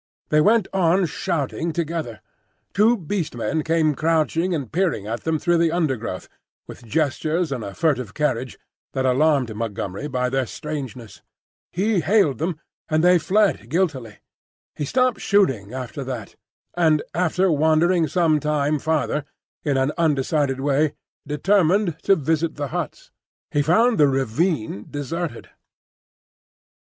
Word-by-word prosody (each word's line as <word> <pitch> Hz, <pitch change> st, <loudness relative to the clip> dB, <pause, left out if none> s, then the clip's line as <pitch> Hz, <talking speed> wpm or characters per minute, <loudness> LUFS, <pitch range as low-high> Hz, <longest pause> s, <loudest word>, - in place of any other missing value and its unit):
They 150 Hz, 0 st, +4 dB
went 215 Hz, +3 st, +3 dB
on 185 Hz, 0 st, +3 dB
shouting 165 Hz, 0 st, -2 dB
together. 160 Hz, -8 st, -3 dB, 0.5 s
Two 225 Hz, +4 st, +4 dB
Beast 175 Hz, -, -3 dB
Men 120 Hz, +7 st, -1 dB
came 160 Hz, -1 st, +2 dB
crouching 165 Hz, +3 st, +1 dB
and 140 Hz, -7 st, -5 dB
peering 170 Hz, -, 0 dB
at 115 Hz, +2 st, -5 dB
them 160 Hz, -1 st, +1 dB
through 170 Hz, +2 st, +1 dB
the 165 Hz, -1 st, +3 dB
undergrowth, 130 Hz, -, -2 dB, 0.4 s
with -, -, -11 dB
gestures 155 Hz, +5 st, -1 dB
and 125 Hz, -5 st, -3 dB
a 100 Hz, -1 st, -7 dB
furtive 130 Hz, -10 st, 0 dB
carriage 130 Hz, -5 st, -1 dB, 0.4 s
that 130 Hz, 0 st, -1 dB
alarmed 130 Hz, -2 st, +2 dB
Montgomery 105 Hz, +2 st, -4 dB
by 125 Hz, -3 st, -1 dB
their 135 Hz, -2 st, 0 dB
strangeness. 130 Hz, -7 st, -7 dB, 0.5 s
He 200 Hz, +2 st, +1 dB
hailed 170 Hz, -4 st, +2 dB
them, 165 Hz, 0 st, -2 dB, 0.3 s
and 155 Hz, 0 st, +2 dB
they 180 Hz, 0 st, +6 dB
fled 195 Hz, -, +1 dB
guiltily. 135 Hz, -, -1 dB, 0.6 s
He 145 Hz, -, -3 dB
stopped 255 Hz, -, +1 dB
shouting 135 Hz, -, +2 dB
after 130 Hz, +2 st, -5 dB
that, 125 Hz, -5 st, -6 dB, 0.4 s
and 160 Hz, -4 st, +2 dB
after 180 Hz, +2 st, +1 dB
wandering 160 Hz, +3 st, +3 dB
some 155 Hz, 0 st, +2 dB
time 150 Hz, 0 st, 0 dB
farther 155 Hz, -1 st, 0 dB, 0.4 s
in 145 Hz, -3 st, +1 dB
an 135 Hz, +2 st, +1 dB
undecided 145 Hz, -3 st, +1 dB
way, 145 Hz, +2 st, +1 dB, 0.3 s
determined 180 Hz, +3 st, +2 dB
to 195 Hz, -, +4 dB
visit 160 Hz, +1 st, -1 dB
the 145 Hz, -2 st, -4 dB
huts. 170 Hz, -4 st, -5 dB, 0.4 s
He 145 Hz, -, +2 dB
found 220 Hz, -, +3 dB
the 145 Hz, -, +6 dB
ravine 135 Hz, -, -1 dB
deserted. 145 Hz, 0 st, -5 dB
155 Hz, 135 wpm, -22 LUFS, 135-170 Hz, 0.6 s, they